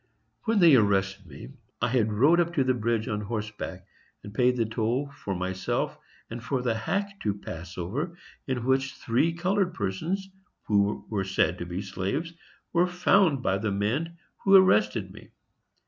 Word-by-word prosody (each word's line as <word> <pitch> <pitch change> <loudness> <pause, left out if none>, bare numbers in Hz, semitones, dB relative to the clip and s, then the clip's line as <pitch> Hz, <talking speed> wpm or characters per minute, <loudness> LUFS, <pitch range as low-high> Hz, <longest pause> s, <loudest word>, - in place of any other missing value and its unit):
When 225 0 +2
they 170 -5 +7
arrested 100 -3 +1
me, 70 -5 -10 0.3
I - - +1
had 110 -3 +1
rode 140 +11 +4
up 170 0 0
to 140 - +3
the 130 0 +2
bridge 115 -1 -1
on 105 0 -2
horseback 105 -4 -5 0.4
and 100 - -9
paid 125 +1 +2
the 115 - +2
toll 115 +6 -1
for 100 -9 -5
myself 95 +1 -2 0.3
and 115 0 -7
for 125 +1 -1
the 120 -2 +1
hack 195 - -2
to 105 -2 0
pass 90 -3 -8
over, 140 - -3 0.3
in 125 -3 -2
which 130 0 +1
three 125 +8 +1
colored 180 +2 0
persons, 160 - -2 0.4
who 100 0 +1
were 100 -3 -1
said 90 -3 +1
to 85 - -5
be 90 +3 -4
slaves, 140 - -3 0.4
were 175 +1 +4
found 180 -5 +3
by 95 +1 +1
the 105 +1 -1
men 125 +13 -1 0.2
who 195 0 +5
arrested 105 - +4
me. - - -14
115 Hz, 170 wpm, -27 LUFS, 100-165 Hz, 0.4 s, they